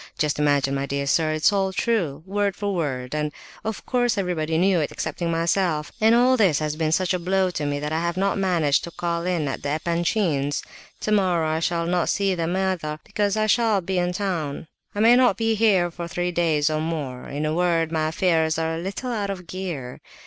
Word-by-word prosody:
Just 150 Hz, -1 st, 0 dB
imagine, 145 Hz, -2 st, +2 dB
my 140 Hz, 0 st, -2 dB
dear 140 Hz, 0 st, -2 dB
sir, 155 Hz, +3 st, +2 dB
it 155 Hz, 0 st, -4 dB
is -, -, +6 dB
all 195 Hz, -1 st, +1 dB
true—word 195 Hz, -1 st, -1 dB
for 205 Hz, -1 st, -2 dB
word—and, 150 Hz, -2 st, -2 dB, 0.3 s
of 220 Hz, -1 st, -4 dB
course, 245 Hz, -3 st, +1 dB
everybody 165 Hz, -4 st, -1 dB
knew 185 Hz, +1 st, +3 dB
it 150 Hz, -, -1 dB
excepting 170 Hz, +2 st, -3 dB
myself. 165 Hz, -1 st, 0 dB
All 240 Hz, +4 st, +5 dB
this 190 Hz, -, +4 dB
has 150 Hz, -1 st, -2 dB
been 155 Hz, -1 st, 0 dB
such 185 Hz, +3 st, +1 dB
a 180 Hz, -, 0 dB
blow 185 Hz, +1 st, +1 dB
to 150 Hz, -4 st, -3 dB
me 145 Hz, 0 st, -1 dB
that 150 Hz, +1 st, -4 dB
I 160 Hz, -, +1 dB
have 170 Hz, +1 st, -2 dB
not 195 Hz, +1 st, +1 dB
managed 170 Hz, -7 st, +2 dB
to -, -, -7 dB
call 170 Hz, 0 st, -3 dB
in 170 Hz, -5 st, 0 dB
at 135 Hz, -, -4 dB
the 140 Hz, -, -3 dB
Epanchins'. 170 Hz, -3 st, 0 dB, 0.4 s
Tomorrow 185 Hz, -6 st, +1 dB
I 155 Hz, +1 st, 0 dB
shall 170 Hz, 0 st, 0 dB
not 175 Hz, 0 st, 0 dB
see 200 Hz, -2 st, +1 dB
them 170 Hz, 0 st, -1 dB
either, 180 Hz, -5 st, -1 dB
because 205 Hz, 0 st, -1 dB
I 215 Hz, -, +2 dB
shall 220 Hz, -1 st, +3 dB
be 190 Hz, 0 st, -2 dB
in 175 Hz, 0 st, 0 dB
town. 175 Hz, -7 st, -3 dB, 0.3 s
I 205 Hz, -, 0 dB
may 230 Hz, +2 st, +7 dB
not 250 Hz, -1 st, +4 dB
be 225 Hz, -1 st, +1 dB
here 200 Hz, -5 st, +3 dB
for 170 Hz, 0 st, -6 dB
three 175 Hz, +1 st, -2 dB
days 160 Hz, -3 st, +1 dB
or 155 Hz, 0 st, -1 dB
more; 150 Hz, -6 st, -4 dB
in 145 Hz, +2 st, -3 dB
a 155 Hz, -, 0 dB
word, 165 Hz, -1 st, +1 dB
my 155 Hz, -1 st, 0 dB
affairs 160 Hz, -1 st, +1 dB
are 160 Hz, 0 st, -1 dB
a 165 Hz, -, -3 dB
little 195 Hz, +8 st, -4 dB
out 205 Hz, -4 st, -2 dB
of 185 Hz, -2 st, -5 dB
gear. 165 Hz, -9 st, -6 dB
170 Hz, 215 wpm, -23 LUFS, 155-195 Hz, 0.4 s, may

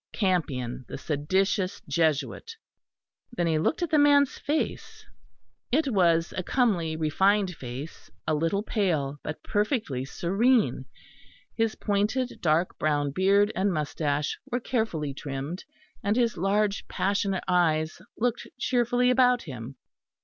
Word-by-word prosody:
"Campion, 140 Hz, -, -1 dB
the -, -, -6 dB
Seditious 185 Hz, +7 st, 0 dB
Jesuit." 155 Hz, -, 0 dB, 0.8 s
Then 175 Hz, -7 st, 0 dB
he 160 Hz, -2 st, +2 dB
looked 320 Hz, -, 0 dB
at 335 Hz, -, -2 dB
the 305 Hz, -, +4 dB
man's 285 Hz, -1 st, +4 dB
face. 300 Hz, +3 st, -3 dB, 0.7 s
It 290 Hz, +2 st, +2 dB
was 170 Hz, -3 st, +3 dB
a -, -, -1 dB
comely 180 Hz, -8 st, +1 dB
refined 190 Hz, +5 st, +2 dB
face, 135 Hz, +3 st, -8 dB, 0.2 s
a 155 Hz, -, +1 dB
little 165 Hz, +7 st, 0 dB
pale 155 Hz, -, -1 dB
but 150 Hz, -, -6 dB
perfectly 205 Hz, -, -1 dB
serene: 210 Hz, -, +1 dB, 0.7 s
his 225 Hz, -1 st, 0 dB
pointed 215 Hz, +5 st, -1 dB
dark 165 Hz, +2 st, +1 dB
brown 145 Hz, -2 st, +1 dB
beard 200 Hz, +6 st, +3 dB
and 195 Hz, +1 st, +1 dB
moustache 150 Hz, -2 st, -1 dB
were 245 Hz, -1 st, 0 dB
carefully 220 Hz, -, -2 dB
trimmed; 140 Hz, +5 st, -5 dB, 0.4 s
and 205 Hz, +2 st, +1 dB
his 235 Hz, -3 st, +2 dB
large 200 Hz, +3 st, 0 dB
passionate 195 Hz, 0 st, 0 dB
eyes 160 Hz, -3 st, +1 dB, 0.2 s
looked 240 Hz, 0 st, -1 dB
cheerfully 250 Hz, 0 st, +2 dB
about 250 Hz, -1 st, +4 dB
him. 130 Hz, -3 st, -8 dB
185 Hz, 125 wpm, -27 LUFS, 155-225 Hz, 0.8 s, the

